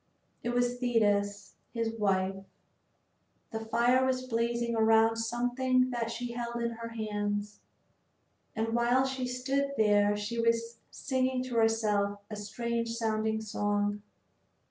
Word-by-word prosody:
It 235 - -3
was 245 0 0
Thetis, 205 -4 +1 0.2
his 230 -1 -1
wife. 195 -3 0 1.1
The 220 - -3
fire 235 +3 +2
was 255 -1 0
blazing 235 -1 0
around 225 0 +4
something 245 +2 +1
that 235 -2 -2
she 240 +1 -4
held 235 0 -4
in 235 0 -1
her 230 0 -6
hands. 210 -2 -3 1.0
And 225 0 -1
while 240 +3 +3
she 265 -1 -2
stood 270 +3 -1
there 205 -1 +4
she 215 +3 -3
was 230 0 0
singing 260 -1 -1
to 255 -2 -5
herself 210 -3 +2
a - - -3
strange 230 +3 -3
sounding 220 -1 0
song. 205 -1 -1
230 Hz, 125 wpm, -30 LUFS, 210-245 Hz, 1.1 s, around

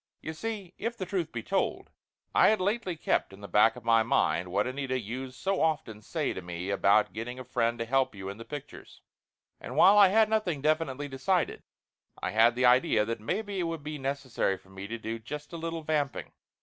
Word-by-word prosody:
You 160 - -6
see 200 0 -5
if 230 +2 -3
the 185 - -3
truth 180 -4 -2
be 115 -2 -5
told, 195 +9 -1 0.4
I - - +6
had 215 - +3
lately 195 -1 -1
kept 100 - 0
in 95 - -13
the 100 - -7
back 110 +4 +4
of 125 -2 -12
my 115 -1 +5
mind 85 -6 +1
what 95 - +1
Anita 130 0 -2
used 125 +4 -6
so 190 +8 -1
often 140 -9 -1
say - - -2
to - - -6
me 90 +2 -5
about 100 +2 +3
getting 115 +3 -5
a 130 - -6
friend 120 -2 0
to 115 - -3
help 135 -1 +1
you 95 -1 -7
in 100 +1 -6
the 115 - -8
pictures. 145 +2 -10 0.6
And - - -7
while 205 +2 +7
I 200 - +9
had 220 +3 +4
nothing 215 -8 0
definitely 145 -2 0
decided, 145 +7 0 0.6
I - - -2
had 115 +2 +5
the 125 +1 +2
idea 125 -3 +4
that 115 0 -3
maybe 200 - -3
it - - +1
would 165 -3 -5
be 150 0 -5
necessary 135 -7 -1
for 95 +1 -21
me 95 +1 -7
to 115 +2 -4
do 115 0 -5
just 150 +8 -8
a - - -4
little 165 0 -4
vamp 150 -3 0
ing. - - -7
130 Hz, 220 wpm, -29 LUFS, 115-165 Hz, 0.6 s, I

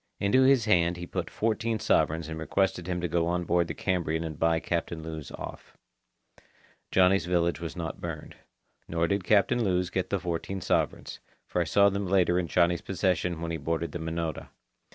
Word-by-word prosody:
Into 100 +6 +3
his 130 -3 +5
hand 85 -4 +3
he 85 - -6
put - - -4
fourteen 115 +1 -1
sovereigns 80 -5 +1
and 80 0 -6
requested 90 +1 0
him 90 -1 -2
to 90 - 0
go 85 0 0
on 90 0 0
board 85 0 +1
the - - -5
Cambrian 85 -4 -1
and 80 -2 -6
buy 80 0 +3
Captain 85 -1 -3
Lewes 80 -3 -6
off. - - -9 1.1
Johnny's 90 -2 +3
village 85 -3 +1
was 85 0 -6
not 85 -3 -5
burned. - - -6 0.5
Nor 85 0 0
did 100 0 0
Captain 110 +5 +3
Lewes 90 -3 0
get 95 -1 -1
the 100 - 0
fourteen 90 +2 -3
sovereigns, 90 - -1 0.3
for 90 - -1
I - - 0
saw 100 +4 +4
them 100 0 -2
later 90 -1 +3
in 90 - -2
Johnny's 85 0 +2
possession 90 -3 -1
when 85 0 -3
he 80 - -2
boarded 80 +2 -2
the 85 - -5
Minota. 80 -1 -4
85 Hz, 190 wpm, -28 LUFS, 85-95 Hz, 1.1 s, his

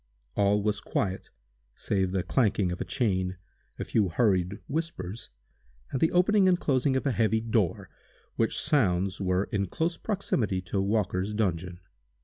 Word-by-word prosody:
All 100 0 +2
was 105 -1 0
quiet, 95 -1 -2 0.5
save 95 -2 0
the 95 -1 -1
clanking 100 -3 +1
of 90 - -5
a - - +1
chain, 95 -7 -1 0.4
a - - -3
few 105 -4 +1
hurried 95 -1 +1
whispers, 120 - -4 0.6
and 130 - -2
the 160 - +3
opening 190 +2 +4
and 180 -1 +3
closing 130 -1 +1
of 130 - -1
a 140 - +2
heavy 110 -1 +2
door, 110 -5 0 0.5
which - - +1
sounds 95 - +1
were 90 0 +1
in 100 -1 0
close 165 - -1
proximity 130 - -1
to 95 +2 -1
Walker's 100 -1 0
dungeon. 90 -3 -2
105 Hz, 150 wpm, -28 LUFS, 95-130 Hz, 0.6 s, opening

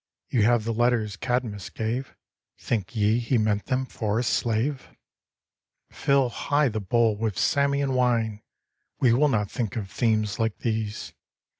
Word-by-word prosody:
You 120 - +1
have 120 -1 +3
the 115 +1 -2
letters 115 -3 +1
Cadmus 120 -5 -2
gave 120 +4 -3 0.2
— - - -64
Think 110 0 -3
ye 110 +2 +2
he 120 +1 +1
meant 105 -2 0
them 130 0 0
for 110 -4 -2
a 120 - +1
slave? 120 +4 0 1.0
Fill 140 -2 +2
high 145 +3 +1
the 110 -1 -3
bowl 115 +2 +2
with 105 -3 -2
Samian 140 -1 +1
wine! 115 -4 +1 0.6
We 120 -3 +4
will 145 +5 +4
not 105 -6 0
think 115 -6 -3
of 100 -5 -4
themes 110 -4 0
like 110 -2 0
these! 110 -2 -3
115 Hz, 155 wpm, -25 LUFS, 110-125 Hz, 1.0 s, We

